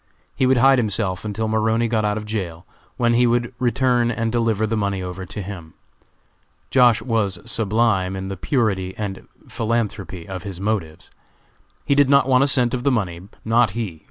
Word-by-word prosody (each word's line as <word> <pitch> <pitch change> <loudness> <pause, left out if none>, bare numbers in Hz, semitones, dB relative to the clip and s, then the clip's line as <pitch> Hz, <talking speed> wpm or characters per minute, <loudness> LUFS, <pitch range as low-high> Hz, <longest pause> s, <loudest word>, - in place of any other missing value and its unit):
He 130 - +2
would 130 0 +4
hide 135 +1 +5
himself 100 -4 -1
until 110 +1 -3
Maroney 110 +1 +1
got 110 -2 0
out 105 0 0
of 105 - -5
jail, 95 -6 -5 0.3
when 120 -1 +2
he 120 +1 +4
would 120 +1 0
return 125 -1 +2
and 115 -1 -1
deliver 115 -2 +1
the 110 +1 -1
money 100 -3 -1
over 90 +1 -6
to 100 +1 -6
him. 90 -5 -9 1.0
Josh. 125 -4 +4
was 110 -6 0
sublime 110 -4 0
in 95 0 -5
the 95 0 -4
purity 95 -4 -1
and 100 -3 -5 0.2
philanthropy 105 -6 -3
of 95 -2 -6
his 95 -3 -7
motives. 95 -6 -3 0.7
He - - +2
did 140 -1 +4
not 140 -1 +4
want 130 0 +4
a - - +3
cent 125 -3 +2
of 125 - -1
the 140 - +2
money; 95 -9 -1 0.2
not 115 -1 +3
he! 95 -9 -4
110 Hz, 185 wpm, -21 LUFS, 95-120 Hz, 1.0 s, hide